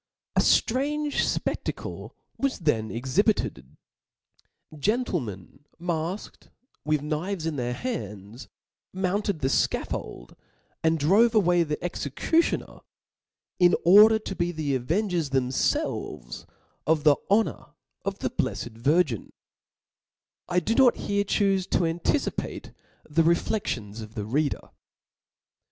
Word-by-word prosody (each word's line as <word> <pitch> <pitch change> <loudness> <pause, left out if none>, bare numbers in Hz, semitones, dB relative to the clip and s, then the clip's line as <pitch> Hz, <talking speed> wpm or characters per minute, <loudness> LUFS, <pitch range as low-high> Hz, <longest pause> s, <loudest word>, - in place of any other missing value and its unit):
A - - +4
ftrange 290 +4 +2 0.3
fpeftack - - -4 0.3
was, 275 -1 -1
then 115 - 0
exhibited; 125 - -1 1.0
gentlemen 145 - -2 0.2
mafked,, 170 +3 -4 0.3
with 150 -1 0
knives 160 +4 -3
in 160 -2 -2
their 125 -2 -2
hands, 110 - -6 0.4
mounted 190 -1 -1
the 130 - +1
fcafix)ld, - - -2 0.5
and 160 0 +3
drove 205 +10 +4
away 180 -4 +4
the 150 -2 -1
executioner, 175 - -1 0.8
in 180 -1 +6
order 210 +5 +8
to 215 -3 -6
be 175 -1 0
the 155 -4 -2
avengers 165 - 0
them 130 -2 +1
felves - - -2 0.4
of 155 -1 +2
the 150 -2 +6
honor 215 +3 0 0.3
of - - -3
the - - 0
blefled 115 -1 -3
Virgin*' 140 - +1 0.6
— - - -68
I 180 0 +3
do 180 +6 -1
not 255 -1 +5
here 200 0 0
chufe 195 -2 +1
to 175 - +2
anticipate 170 - -2 0.4
the 155 +2 +2
refleftions 145 - 0
of 110 +1 -10
the 105 -3 -3
reader. 145 +6 -1
165 Hz, 115 wpm, -26 LUFS, 135-200 Hz, 1.0 s, order